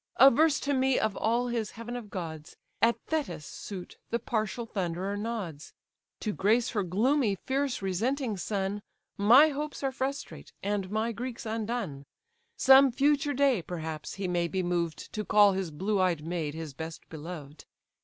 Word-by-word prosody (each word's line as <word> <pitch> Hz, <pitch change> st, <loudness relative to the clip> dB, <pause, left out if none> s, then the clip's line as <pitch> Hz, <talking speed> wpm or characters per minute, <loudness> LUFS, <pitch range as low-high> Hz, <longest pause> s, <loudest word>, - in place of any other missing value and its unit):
Averse 275 Hz, +4 st, +6 dB
to 285 Hz, -, 0 dB
me 265 Hz, -1 st, +2 dB
of 210 Hz, -, 0 dB
all 235 Hz, +3 st, +1 dB
his 230 Hz, -3 st, -1 dB
heaven 235 Hz, +1 st, -6 dB
of 235 Hz, -4 st, -7 dB
gods, 160 Hz, -6 st, -6 dB, 0.3 s
At 235 Hz, +1 st, +4 dB
Thetis' 300 Hz, -, -2 dB
suit 185 Hz, +2 st, -8 dB
the 235 Hz, -, +1 dB
partial 230 Hz, 0 st, -2 dB
Thunderer 190 Hz, -1 st, -2 dB
nods; 205 Hz, -9 st, -5 dB, 0.5 s
To 215 Hz, -, -1 dB
grace 225 Hz, +6 st, +2 dB
her 210 Hz, -, 0 dB
gloomy, 215 Hz, -, +2 dB
fierce, 265 Hz, +1 st, -2 dB
resenting 225 Hz, +6 st, 0 dB
son, 195 Hz, +1 st, -2 dB, 0.3 s
My 245 Hz, +10 st, +7 dB
hopes 295 Hz, 0 st, -4 dB
are 270 Hz, -, +1 dB
frustrate, 270 Hz, +1 st, -5 dB
and 200 Hz, -1 st, -1 dB
my 220 Hz, +3 st, 0 dB
Greeks 240 Hz, +2 st, -6 dB
undone. 220 Hz, -, -3 dB, 0.5 s
Some 270 Hz, 0 st, +7 dB
future 290 Hz, +3 st, +2 dB
day, 270 Hz, -6 st, +3 dB
perhaps, 160 Hz, -3 st, -5 dB
he 195 Hz, -1 st, -3 dB
may 175 Hz, -1 st, +1 dB
be 185 Hz, +2 st, -1 dB
moved 170 Hz, -2 st, -2 dB
To 215 Hz, -, -2 dB
call 205 Hz, -1 st, +5 dB
his 190 Hz, -2 st, -2 dB
blue 190 Hz, +6 st, 0 dB
eyed 170 Hz, -5 st, +1 dB
maid 165 Hz, -3 st, -3 dB
his 160 Hz, -3 st, -6 dB
best 160 Hz, +3 st, -7 dB
beloved. 155 Hz, -2 st, -8 dB
210 Hz, 160 wpm, -29 LUFS, 180-245 Hz, 0.5 s, My